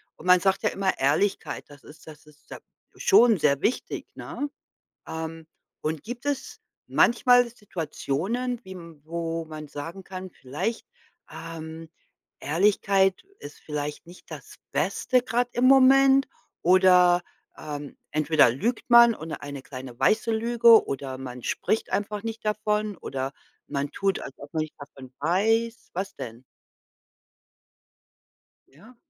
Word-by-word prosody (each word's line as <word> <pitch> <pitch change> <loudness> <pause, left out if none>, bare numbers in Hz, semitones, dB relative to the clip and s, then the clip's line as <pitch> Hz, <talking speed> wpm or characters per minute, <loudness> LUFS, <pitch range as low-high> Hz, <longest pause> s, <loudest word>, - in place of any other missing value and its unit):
und 155 - -14
man 180 0 +7
sagt 190 +1 +1
ja - - +3
immer 195 -1 -1
Ehrlichkeit, 150 +9 0
das 145 -2 -15
ist 155 +1 -16
das 155 0 -13
ist 150 0 -22
ja - - -7 0.4
schon 245 - +5
sehr 140 -3 +2
wichtig, 245 - -2
ne? 290 - -5 0.6
Ähm, 160 0 -6 0.3
und 155 -1 -3
gibt 245 +3 -7
es 285 -2 -3 0.3
manchmal 245 +1 +4
Situationen, 210 - -3
wie 190 - -9
m 170 -4 -12
wo 165 0 -3
man 155 -1 -8
sagen 165 +7 -8
kann: 185 0 -8
„Vielleicht 175 - -4 0.4
ähm, 165 0 -8 0.5
Ehrlichkeit 195 +3 +2 0.2
ist 145 - -11
vielleicht 150 -1 -5
nicht 175 +1 -15
das - - -10 0.2
Beste 255 -2 +1
grad 245 0 0
im 245 - 0
Moment“, 270 +1 +6 0.4
oder 180 -1 +5 0.3
„Ähm, 145 -2 -7
entweder 155 -3 +4
lügt 225 - -3
man“, 235 -1 +8
und 160 -5 -9
oder - - -5
„Eine 140 -1 -7
kleine 130 -3 -9
weiße 225 +1 +2
Lüge“, 230 0 +5
oder 135 -1 -4
„Man 125 -2 -8
spricht 220 - -1
einfach 205 +1 -2
nicht 225 0 -6
davon“, 210 -1 -1
oder 135 0 -4 0.4
„Man 140 0 -3
tut, 195 -1 0
als 135 - -8
ob 145 - -12
man 160 - 0
nicht 155 - -8
davon 135 -3 -12
weiß.“ 225 +8 0
Was 190 +3 -4
denn? 115 +1 -8 2.3
Ja. 220 - -18
180 Hz, 140 wpm, -26 LUFS, 150-225 Hz, 2.3 s, man